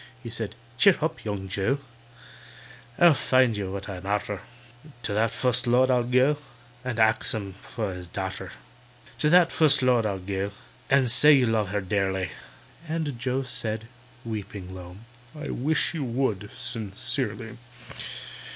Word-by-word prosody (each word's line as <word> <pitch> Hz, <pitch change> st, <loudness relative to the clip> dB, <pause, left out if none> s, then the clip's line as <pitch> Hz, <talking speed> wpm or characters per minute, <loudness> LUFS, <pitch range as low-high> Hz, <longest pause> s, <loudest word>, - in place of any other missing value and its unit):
Says 115 Hz, -2 st, -1 dB
he, -, -, -17 dB, 0.2 s
"Cheer 200 Hz, -, +7 dB
hup, 160 Hz, 0 st, -3 dB
young 100 Hz, -3 st, -4 dB
JOE! 100 Hz, +8 st, 0 dB, 1.2 s
I'll 175 Hz, -2 st, +7 dB
tell 130 Hz, -2 st, +3 dB
you 100 Hz, -3 st, -4 dB
what 95 Hz, 0 st, -6 dB
I'm 95 Hz, -1 st, -7 dB
arter— 105 Hz, -1 st, -2 dB, 0.6 s
To 105 Hz, -, -2 dB
that 110 Hz, +2 st, +2 dB
Fust 125 Hz, +2 st, +2 dB
Lord 130 Hz, +2 st, +4 dB
I'll 125 Hz, -1 st, +3 dB
go 130 Hz, +4 st, +3 dB, 0.5 s
And 125 Hz, -3 st, -4 dB
ax 110 Hz, 0 st, +4 dB
him 100 Hz, -3 st, -5 dB
for 105 Hz, -5 st, -4 dB
his 90 Hz, -1 st, -8 dB
darter. 95 Hz, +1 st, -5 dB, 0.7 s
"To 150 Hz, -, +3 dB
that 175 Hz, 0 st, +5 dB
Fust 150 Hz, -4 st, +4 dB
Lord 120 Hz, -3 st, +3 dB
I'll 100 Hz, -2 st, -2 dB
go 95 Hz, +2 st, -4 dB, 0.4 s
And 135 Hz, -2 st, +4 dB
say 150 Hz, +5 st, +9 dB
you 135 Hz, -3 st, +4 dB
love 110 Hz, -3 st, +1 dB
her 100 Hz, +2 st, -2 dB
dearly." 95 Hz, -2 st, -1 dB, 0.6 s
And 155 Hz, -6 st, -3 dB
JOE 130 Hz, +2 st, -1 dB
said 115 Hz, -3 st, -3 dB, 0.4 s
(weeping 100 Hz, -4 st, -6 dB
low), 90 Hz, 0 st, -10 dB, 0.4 s
"I 150 Hz, -, -5 dB
wish 155 Hz, +7 st, 0 dB
you 160 Hz, -4 st, -3 dB
would, 115 Hz, -5 st, -2 dB
sincerely!" 110 Hz, +2 st, -2 dB
115 Hz, 150 wpm, -26 LUFS, 100-130 Hz, 1.2 s, say